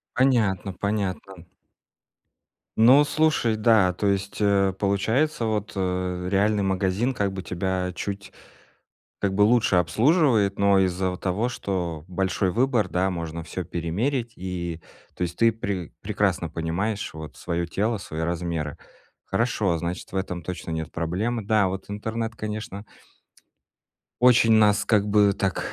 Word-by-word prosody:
Понятно, 105 -8 +2
понятно. 95 -3 -3 1.3
Ну, 125 +6 +7
слушай, 145 -6 +1
да 105 -4 +4
то 100 +3 -3
есть, 100 0 -1
э, 100 -2 +3
получается, 110 +7 +1
вот, 105 -2 -2
э, 90 -1 -2
реальный 100 +1 +2
магазин, 95 +6 0
как 100 -4 -1
бы 95 -1 -5
тебя 90 +1 -2
чуть, 100 +2 -5 0.9
как 95 -1 0
бы, 105 - +3
лучше 110 -3 +4
обслуживает, 110 - +3
но 100 -1 +4
из-за 95 0 0
вот 90 - -7
того, 100 +6 0
что 90 -9 -3
большой 95 0 0
выбор, 120 -3 +1
да, 95 +2 0
можно 85 -1 -5
всё 90 +2 -5
перемерить, 115 - -2
и, 85 -2 -5 0.4
то - - -4
есть 85 0 -2
ты 115 0 +5
пре 100 -6 -4
прекрасно - - 0
понимаешь, 95 +6 -3
вот, 80 -1 -9
свое 85 -1 -2
тело, 110 +5 -1
свои 80 -3 -6
размеры. 85 -3 -3 0.5
Хорошо, 110 -7 0
значит, 85 +2 -5
в - - -4
этом 90 -2 -3
точно 85 0 -6
нет 80 -1 -4
проблем. 100 +7 -2
Да, 105 -3 +3
вот 95 0 -5
интернет, 110 +2 -3
конечно 105 -1 -5 1.4
очень 125 -2 +6
нас, 105 -2 +4
как 105 -2 +2
бы, 105 -1 +4
так, 95 -1 -2
100 Hz, 140 wpm, -25 LUFS, 90-110 Hz, 1.4 s, Ну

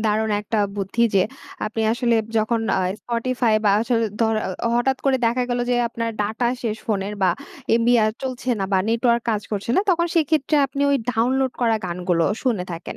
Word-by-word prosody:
দারুণ 215 +1 +1
একটা 215 +1 -2 0.2
বুদ্ধি 200 +4 -1
যে 190 - +5 0.4
আপনি 220 +1 -4
আসলে 240 -1 +1 0.2
যখন 225 +1 +1 0.2
আ - - +1 0.2
Spotify 240 -1 0
বা 205 - +5
আসলে 230 0 +1 0.2
ধ - - +4 0.5
হঠাৎ 265 +3 +2
করে 270 -1 +3
দেখা 240 +2 +1
গেল 245 - 0
যে 245 - +2
আপনার 230 0 -3
ডাটা 220 +3 -1
শেষ 220 -3 -1
ফোনের 205 -1 -1
বা 185 - +4 0.4
এমবি 235 +1 +3
আ - - +4 0.2
চলছে 255 -1 -5
না - - +1
বা 190 - +4
নেটওয়র্ক 235 +1 +2
কাজ 210 -2 -1
করছে 205 +2 -2
না, - - +5
তখন 340 -1 +2
সেক্ষেত্রে 310 -2 +2
আপনি 280 +1 -3
ওই 280 - +4 0.2
ডাউনলোড 255 +3 +1
করা 230 -2 +3
গানগুলো 175 -1 0 0.2
শুনে 230 -9 0
থাকেন 170 0 -7
230 Hz, 185 wpm, -22 LUFS, 215-250 Hz, 0.5 s, যে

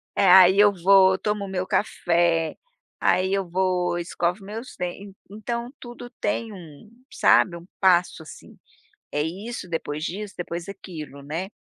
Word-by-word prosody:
Eh, 200 - +2
aí 190 +1 +7
eu 205 0 +7
vou, 190 +1 +5
tomo 210 0 -2
o - - -8
meu 185 -1 -3
café, 170 -5 0 0.4
aí 190 +1 +2
eu 195 -2 -1
vou 180 -1 0
escovo 175 +2 -2
meus 225 +5 -8
dentes, 190 +3 -6 0.2
então 235 +3 -5
tudo 240 0 -10
tem 220 +2 -2
um 175 0 -13 0.2
sabe 180 - +3
um 170 0 -11
passo, 180 -3 +2
assim, 155 - -14 0.5
é 150 - -1
isso, 190 +5 -5
depois 155 -2 -4
disso, 200 +3 -5
depois 170 -1 -5
daquilo, 155 -8 -9
né, 165 +7 -5
185 Hz, 150 wpm, -24 LUFS, 170-200 Hz, 0.5 s, aí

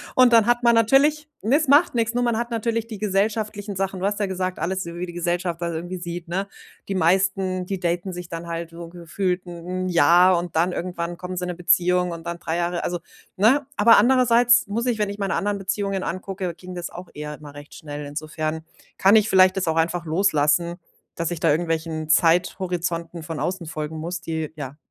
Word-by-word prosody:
Und 255 -1 +6
dann 225 -2 +6
hat 240 0 +2
man 235 0 +5
natürlich 285 +7 +3
ne, 250 +8 +3
es 310 -3 -1
macht 290 +3 +5
nix, 230 -1 0
nur 245 0 0
man 235 -2 +1
hat 235 0 -3
natürlich 230 0 -1
die 215 -3 -8
gesellschaftlichen 210 0 -1
Sachen. 195 0 -2
Du 190 - -2
hast 205 +1 -1
ja 200 - +1
gesagt, 185 -2 -3
alles 185 +3 -2
wie 170 +1 -5
die 175 - -8
Gesellschaft 175 0 -2
das 170 0 -2
irgendwie 175 +3 -5
sieht, 175 -1 -6
ne? 195 +3 -2 0.4
Die 195 - -2
meisten, 185 +1 +1
die 190 0 -4
daten 175 +2 -1
sich 180 -1 -7
dann 165 0 -6
halt 170 0 -5
wo 170 0 -8
gefühlt 180 +2 -3
'n 180 +1 -5
'n - - -2
Jahr 175 +1 +5
und 175 -2 -7
dann 175 +3 +2
irgendwann 175 -1 -4
kommen 180 +1 -6
sie 180 - -3
in 180 - -3
'ne 180 - -4
Beziehung 180 0 +2
und 165 0 -8
dann 170 0 -4
3 160 - -3
Jahre 175 0 -1
also, 175 0 -2 0.4
ne? 255 +9 +3
Aber 230 +2 +6
andererseits 240 0 +5
muss 225 +4 -2
ich 245 -3 0
wenn 210 -2 0
ich 200 - -7
meine 195 -1 -1
anderen 205 0 -1
Beziehungen 195 0 -2
angucke, 185 0 -4
ging 185 0 -10
das 175 -1 -5
auch 180 +1 -10
eher 150 0 -6
immer 145 -1 -12
recht 145 +1 -12
schnell. 145 -1 -7
Insofern 155 +2 -4 0.3
kann 200 +3 +6
ich 215 0 +2
vielleicht 185 0 +5
das 190 - -1
auch 160 - +1
einfach 170 +1 0
loslassen, 165 -1 +2 0.4
dass 170 -1 -2
ich 170 - -5
da - - +4
irgendwelchen 160 0 -1
Zeithorizonten 170 0 +1
von 160 -1 -6
außen 175 +1 -2
folgen 155 0 -5
muss, 170 +2 -4
die, 160 -2 -4
ja, 145 -1 -7
180 Hz, 215 wpm, -23 LUFS, 170-200 Hz, 0.4 s, Und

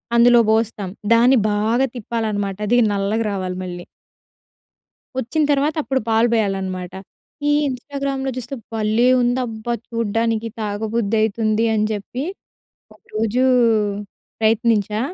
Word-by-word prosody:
అందులో 240 0 +6
బోస్తాం. 220 -3 0 0.2
దాన్ని 245 +3 +5
బాగా 225 +6 +1
తిప్పాలనమాట. 210 -4 -2
అది 240 +3 +3 0.2
నల్లగా 205 +3 0
రావాలి 185 -2 -3
మళ్ళీ. 175 -1 -7 1.3
వచ్చిన 260 +5 0
తర్వాత 290 +2 +1
అప్పుడు 265 -2 -1
పాలు 225 +1 +3
పోయాలనమాట. 190 -4 -1 0.6
ఈ - - +4 0.2
ఇన్‌స్టా‌గ్రామ్‍లో 270 +1 -3
చూస్తే 250 +2 -5 0.2
భలే 220 +2 +1 0.2
ఉందబ్బా! 240 -2 -1 0.2
చూడడానికి 230 0 -1
తాగబుద్ధి 215 +1 -1
అయితుంది 220 +1 +1
అని 215 - +1
చెప్పి, 230 +6 -4 0.7
ఒక - - -25
రోజు 225 +3 +1 1.0
ప్రయత్నించా. 220 -1 +2
225 Hz, 105 wpm, -20 LUFS, 210-240 Hz, 1.3 s, అందులో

